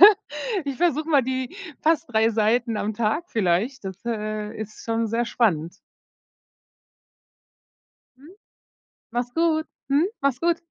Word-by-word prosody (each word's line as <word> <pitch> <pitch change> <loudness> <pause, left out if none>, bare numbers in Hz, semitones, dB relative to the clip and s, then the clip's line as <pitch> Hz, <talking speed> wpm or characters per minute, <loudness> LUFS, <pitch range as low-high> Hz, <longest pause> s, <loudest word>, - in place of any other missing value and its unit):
ja. 390 - +13 0.6
Ich 280 -2 -3
versuche 315 -1 +1
mal 285 -4 +5
die 260 +5 -3 0.2
fast 325 +1 +2
3 220 +1 +4
Seiten 225 +1 +2
am 210 +1 -1
Tag 235 +9 0
vielleicht. 215 +5 +1
Das, 190 -1 -5
äh, 215 -1 -3
ist 215 0 -7
schon 230 0 0
sehr 230 +2 0
spannend. 180 -8 +1 2.4
Mhm. 305 +8 -15 0.8
Mach's 245 +1 -2
gut. 325 -1 +2 0.2
Mhm. 290 +6 +4
Mach's 275 -2 +1
gut. 340 0 +1
240 Hz, 130 wpm, -24 LUFS, 215-295 Hz, 2.4 s, ja